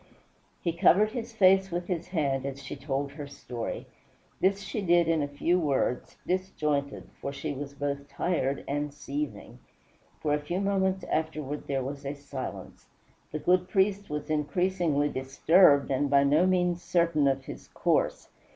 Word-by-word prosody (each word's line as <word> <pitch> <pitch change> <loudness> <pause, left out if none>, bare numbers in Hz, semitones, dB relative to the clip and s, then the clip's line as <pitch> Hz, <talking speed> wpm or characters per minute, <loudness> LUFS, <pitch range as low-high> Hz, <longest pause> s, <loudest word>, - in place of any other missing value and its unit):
He 170 - 0
covered 195 +4 +4
his 235 0 -5
face 190 -3 +4
with 175 0 -3
his 175 -2 -3
hand 140 -7 0
as 140 0 -5
she 135 - -6
told 140 0 -3
her 145 0 -7
story. 125 -4 -6 0.5
This 195 +1 +2
she 210 +2 -4
did 175 -2 +4
in 165 -2 +2
a 145 - 0
few 165 +5 +1
words, 140 -5 -1
disjointed, 150 -6 -1
for 140 - -3
she 145 +1 -4
was 140 +1 -7
both 140 0 -3
tired 140 -5 -1
and 145 +1 -2
seething. 290 - -5 0.6
For 150 -1 0
a 150 - +2
few 175 +5 -3
moments 190 -1 +1
afterward 155 -2 -3
there 135 -2 -1
was 140 +2 -6
a 140 +1 -4
silence; 140 -2 -7 0.4
the 155 - -2
good 180 +3 +2
priest 200 +1 +1
was 150 +1 -4
increasingly 160 -1 +1
disturbed 140 +3 +4
and 140 +2 +1
by 140 0 +5
no 150 +6 +4
means 180 -2 +1
certain 170 -5 +2
of 135 -1 0
his - - -9
course. - - 0
150 Hz, 160 wpm, -28 LUFS, 140-180 Hz, 0.6 s, by